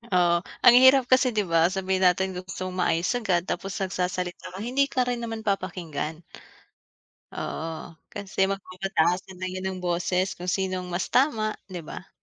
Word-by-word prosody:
Oo, 175 Hz, -1 st, +4 dB, 0.3 s
ang 240 Hz, -, +9 dB
hirap 260 Hz, +1 st, +7 dB
kasi, 255 Hz, +1 st, +5 dB
'di 210 Hz, -, +2 dB
ba? 165 Hz, 0 st, +5 dB
Sabihin 190 Hz, 0 st, +1 dB
natin 190 Hz, +1 st, +1 dB
gusto 180 Hz, 0 st, -6 dB
mong 185 Hz, -, -6 dB
maayos 170 Hz, 0 st, +1 dB
agad, 185 Hz, -7 st, +1 dB
tapos 190 Hz, +1 st, -4 dB
nagsasalita 180 Hz, -2 st, -3 dB
ka -, -, -6 dB
hindi 260 Hz, +4 st, +2 dB
ka 255 Hz, -, +3 dB
rin 245 Hz, -1 st, -2 dB
naman 225 Hz, -1 st, -5 dB
papakinggan. 175 Hz, -5 st, -3 dB, 1.1 s
Oo, 165 Hz, +1 st, -5 dB, 0.2 s
kasi 195 Hz, -1 st, -1 dB
magpapataasan 185 Hz, -1 st, -1 dB
na 185 Hz, -, -4 dB
'yan 185 Hz, 0 st, -4 dB
ng 190 Hz, -, -5 dB
boses 180 Hz, +2 st, 0 dB
kung 180 Hz, +1 st, -5 dB
sinong 185 Hz, -1 st, -2 dB
mas 175 Hz, +1 st, -1 dB
tama, 225 Hz, -5 st, +2 dB, 0.2 s
'di 175 Hz, -4 st, -7 dB
ba? 180 Hz, -, -9 dB
185 Hz, 160 wpm, -26 LUFS, 180-200 Hz, 1.1 s, ang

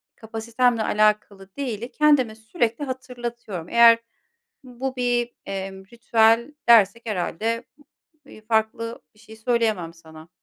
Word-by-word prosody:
kapasitemle 225 Hz, +1 st, -1 dB
alakalı 210 Hz, -2 st, 0 dB
değili, 240 Hz, -4 st, -4 dB
kendime 290 Hz, -7 st, +3 dB
sürekli 230 Hz, +3 st, -2 dB
hatırlatıyorum. 240 Hz, -8 st, -6 dB
Eğer 230 Hz, 0 st, +7 dB, 0.6 s
bu 260 Hz, +1 st, -5 dB
bir, 245 Hz, -1 st, 0 dB
emm, 190 Hz, 0 st, -6 dB
ritüel 230 Hz, +3 st, +2 dB, 0.2 s
dersek 230 Hz, 0 st, +5 dB
herhâlde, 220 Hz, +4 st, -2 dB, 0.6 s
iii, 215 Hz, -, -14 dB
farklı 225 Hz, +1 st, -1 dB
bir 210 Hz, -, -25 dB
şey 220 Hz, 0 st, -14 dB
söyleyemem 220 Hz, -7 st, -1 dB
sana. 160 Hz, -1 st, -15 dB
230 Hz, 110 wpm, -23 LUFS, 210-240 Hz, 0.6 s, Eğer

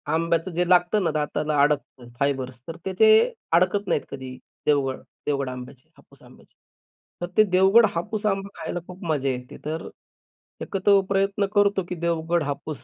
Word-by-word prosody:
आंब्याचं 165 Hz, +2 st, 0 dB
जे 175 Hz, +1 st, 0 dB
लागतं 180 Hz, +3 st, +3 dB
ना, 165 Hz, -, +1 dB
दाताला 150 Hz, 0 st, -1 dB
अडकत 140 Hz, -4 st, 0 dB
फायबर्स 130 Hz, -3 st, -1 dB
तर 165 Hz, -, -6 dB
त्याचे 435 Hz, -, +4 dB, 0.4 s
अडकत 185 Hz, +4 st, +2 dB
नाहीत -, -, +1 dB
कधी 130 Hz, -2 st, -7 dB, 0.3 s
देवगड 140 Hz, -3 st, +1 dB, 0.3 s
देवगड 140 Hz, -2 st, 0 dB
आंब्याचे, 125 Hz, 0 st, -10 dB
हापूस -, -, -22 dB
आंब्याचे. -, -, -19 dB, 0.7 s
तर 175 Hz, -, -2 dB
ते 215 Hz, -, +8 dB
देवगड 195 Hz, +4 st, +5 dB
हापूस 205 Hz, +6 st, -3 dB
आंबा 195 Hz, -1 st, 0 dB
खायला 175 Hz, -, -4 dB
खूप 180 Hz, +1 st, -11 dB
मजा 145 Hz, -4 st, 0 dB
येते. 125 Hz, -1 st, -5 dB
तर 160 Hz, +1 st, -4 dB, 0.7 s
एकत्र 200 Hz, +1 st, +3 dB
प्रयत्न 195 Hz, +1 st, +1 dB
करतो 200 Hz, -1 st, +3 dB
की 180 Hz, -, -3 dB
देवगड 170 Hz, 0 st, 0 dB
हापूस, 145 Hz, 0 st, -5 dB
165 Hz, 155 wpm, -24 LUFS, 140-195 Hz, 0.7 s, ते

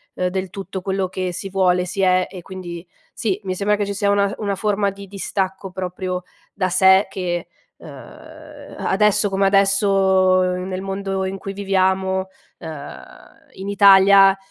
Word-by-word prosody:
uhm, 180 Hz, -, -1 dB
del 185 Hz, 0 st, -3 dB
tutto 195 Hz, -1 st, -7 dB
quello 190 Hz, -1 st, -2 dB
che 185 Hz, -1 st, -3 dB
si 195 Hz, +2 st, -6 dB
vuole, 180 Hz, -2 st, +2 dB
si 195 Hz, +2 st, -4 dB
è. 185 Hz, -1 st, +3 dB
E 185 Hz, -, -9 dB
quindi 175 Hz, -1 st, -9 dB, 0.3 s
sì, 200 Hz, -3 st, -2 dB
mi 185 Hz, -, -3 dB
sembra 205 Hz, +2 st, +1 dB
che 205 Hz, -1 st, -2 dB
ci 200 Hz, -, -4 dB
sia 200 Hz, 0 st, 0 dB
una 200 Hz, 0 st, +3 dB
uhm, 200 Hz, -, -5 dB
una 200 Hz, -2 st, -2 dB
forma 200 Hz, 0 st, 0 dB
di 200 Hz, 0 st, -11 dB
distacco 190 Hz, -1 st, -4 dB
proprio 185 Hz, 0 st, -4 dB, 0.3 s
da 185 Hz, -2 st, -1 dB
sé 190 Hz, +2 st, +5 dB
che, 175 Hz, -2 st, -3 dB, 0.3 s
uhm, -, -, -14 dB
a -, -, -10 dB
adesso 210 Hz, +1 st, +3 dB
come 195 Hz, 0 st, +1 dB
adesso, 195 Hz, +1 st, +3 dB, 0.5 s
uhm, 180 Hz, 0 st, -1 dB
nel 185 Hz, 0 st, -4 dB
mondo 195 Hz, 0 st, -3 dB
in 190 Hz, +1 st, -4 dB
cui 195 Hz, -, -7 dB
viviamo, 190 Hz, -1 st, 0 dB, 0.3 s
uhm, 155 Hz, -3 st, -8 dB, 0.5 s
in 190 Hz, +1 st, -7 dB
Italia, 195 Hz, -1 st, +6 dB
190 Hz, 170 wpm, -20 LUFS, 185-195 Hz, 0.5 s, Italia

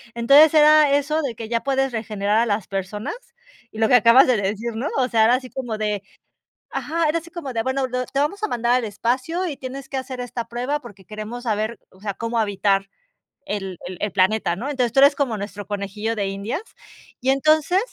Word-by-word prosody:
Entonces 280 Hz, +7 st, +6 dB
era 305 Hz, -1 st, +6 dB
eso 305 Hz, +2 st, 0 dB
de 255 Hz, -6 st, -3 dB
que 225 Hz, 0 st, -7 dB
ya 230 Hz, -1 st, -1 dB
puedes 270 Hz, -1 st, 0 dB
regenerar 215 Hz, -2 st, -1 dB
a 235 Hz, -, +3 dB
las 205 Hz, -2 st, -1 dB
personas 195 Hz, -, -4 dB, 0.6 s
y -, -, -12 dB
lo 220 Hz, -, +4 dB
que 250 Hz, -, +5 dB
acabas 240 Hz, +3 st, +7 dB
de 250 Hz, -3 st, +3 dB
decir, 215 Hz, +4 st, -2 dB
¿no? 250 Hz, +7 st, -2 dB
O 255 Hz, -1 st, +2 dB
sea, 225 Hz, -2 st, +3 dB
era 240 Hz, +3 st, +5 dB
así 255 Hz, -1 st, -5 dB
como 245 Hz, -5 st, -4 dB
de, 210 Hz, -2 st, -2 dB, 0.7 s
ajá, 325 Hz, +1 st, -1 dB
era 330 Hz, +2 st, +1 dB
así 340 Hz, +1 st, -12 dB
como 320 Hz, -6 st, -6 dB
de, 225 Hz, -, 0 dB
bueno, 260 Hz, +1 st, -1 dB
lo 250 Hz, 0 st, -2 dB
te 275 Hz, -, -2 dB
vamos 390 Hz, +8 st, -1 dB
a 430 Hz, -, 0 dB
mandar 240 Hz, 0 st, 0 dB
al 250 Hz, -2 st, +2 dB
espacio, 255 Hz, -, -1 dB
y 295 Hz, -5 st, -4 dB
tienes 265 Hz, +1 st, -8 dB
que 270 Hz, -, -5 dB
hacer 260 Hz, -1 st, -5 dB
esta 240 Hz, -1 st, -5 dB
prueba, 250 Hz, +5 st, -2 dB
porque 205 Hz, -6 st, -13 dB
queremos 215 Hz, +3 st, -7 dB
saber, 220 Hz, 0 st, -1 dB
o 185 Hz, -, -21 dB
sea, 200 Hz, -1 st, -3 dB
cómo 230 Hz, +2 st, -3 dB
habitar 200 Hz, -2 st, +1 dB, 0.6 s
el 195 Hz, -3 st, -4 dB
el 180 Hz, -1 st, -7 dB
el 210 Hz, -, -1 dB
planeta, 185 Hz, -1 st, +2 dB
¿no? 265 Hz, +7 st, -4 dB
Entonces 250 Hz, -4 st, 0 dB
tú 270 Hz, -, +4 dB
eres 280 Hz, +1 st, +7 dB
como 260 Hz, -6 st, -1 dB
nuestro 205 Hz, 0 st, -6 dB
conejillo 210 Hz, +2 st, -3 dB
de 200 Hz, -2 st, -1 dB
indias, 200 Hz, -, -4 dB, 0.6 s
y 260 Hz, -, 0 dB
entonces 310 Hz, +6 st, +3 dB
235 Hz, 220 wpm, -22 LUFS, 210-275 Hz, 0.7 s, acabas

